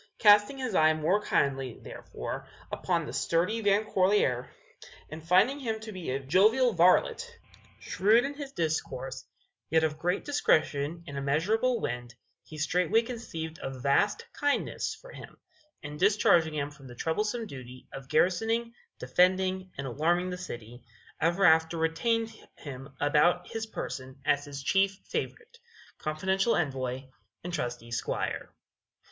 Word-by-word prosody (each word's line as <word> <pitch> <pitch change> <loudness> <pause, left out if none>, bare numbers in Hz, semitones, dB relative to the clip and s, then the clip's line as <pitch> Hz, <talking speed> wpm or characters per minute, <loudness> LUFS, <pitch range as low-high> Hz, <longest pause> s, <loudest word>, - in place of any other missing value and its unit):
Casting 210 +4 +5
his 255 -5 -3
eye 155 -3 +5
more 170 +7 +1
kindly, 135 - 0
therefore, - - -7 0.2
upon - - -1
the - - -7
sturdy 180 +7 0
Van 205 +1 +3
Corlear, 185 - +2 0.6
and 155 0 -8
finding 190 - +3
him 225 -5 -3
to 220 0 -7
be 185 -7 -6
a 135 +2 -1
jovial 215 - +3
varlet, 335 - +3 0.4
shrewd 220 +6 +3
in 280 - -3
his 285 -1 -7
discourse, 225 - -3 0.5
yet 160 0 +3
of 155 -1 -1
great 180 +2 -1
discretion 155 - +1
and 140 -3 -5
immeasurable 210 - +1
wind, 120 - -4 0.3
he 155 - -11
straightway 180 +8 +2
conceived 165 -10 -6
a - - -3
vast 140 +10 +1
kindness 290 -1 -1
for - - -13
him, - - -11 0.5
and 150 0 -7
discharging 175 -5 +4
him 145 -1 -2
from 140 -2 -14
the 120 - -11
troublesome 210 - -1
duty 130 - -10
of 135 -1 -9
garrisoning, 225 +8 +1 0.2
defending 185 +1 +2
and 140 - -4
alarming 170 +8 0
the - - -3
city, 120 -7 -8 0.4
ever 175 +4 +2
after 160 0 +4
retained 225 +8 0 0.2
him 135 -1 -8
about 150 +5 +3
his 225 0 -4
person 130 -9 -6
as 145 0 +2
his 140 -1 -7
chief 195 +5 +2
favorite, 470 +1 -5 0.4
confidential 190 +8 0
envoy 130 -5 -2 0.4
and 175 0 -5
trusty 120 -5 -4
squire. 115 - -3
175 Hz, 140 wpm, -29 LUFS, 145-215 Hz, 0.6 s, Casting